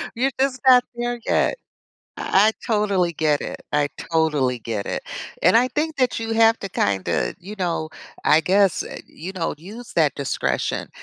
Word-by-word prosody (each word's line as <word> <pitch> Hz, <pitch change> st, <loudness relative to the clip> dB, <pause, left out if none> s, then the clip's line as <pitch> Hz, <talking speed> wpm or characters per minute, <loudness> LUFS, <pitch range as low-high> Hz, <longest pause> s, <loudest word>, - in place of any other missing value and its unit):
you're 265 Hz, +3 st, +1 dB
just 265 Hz, -1 st, +1 dB
not 250 Hz, -1 st, +8 dB
there 240 Hz, 0 st, -2 dB
yet. -, -, +2 dB, 0.6 s
I 210 Hz, +3 st, +4 dB
totally 200 Hz, -6 st, +1 dB
get 150 Hz, -2 st, +1 dB
it, -, -, -6 dB
I 145 Hz, -1 st, +1 dB, 0.2 s
totally 150 Hz, -6 st, +2 dB
get 110 Hz, -3 st, -4 dB
it, -, -, -3 dB, 0.4 s
and -, -, +5 dB
I 245 Hz, +2 st, +5 dB
think 305 Hz, +4 st, -2 dB
that 255 Hz, -3 st, +1 dB
you 225 Hz, 0 st, -4 dB
have 225 Hz, 0 st, +5 dB
to 195 Hz, -, -5 dB
kinda, 95 Hz, -, 0 dB
you 200 Hz, +4 st, -9 dB
know 165 Hz, -3 st, -1 dB, 0.4 s
I 155 Hz, +1 st, +5 dB
guess, 195 Hz, +1 st, +3 dB
eh -, -, -8 dB
you 185 Hz, +5 st, -8 dB
know, 165 Hz, -3 st, -2 dB
use 215 Hz, +9 st, -10 dB
that 155 Hz, -4 st, +2 dB
discretion. 140 Hz, -2 st, -2 dB
190 Hz, 170 wpm, -22 LUFS, 155-230 Hz, 0.6 s, not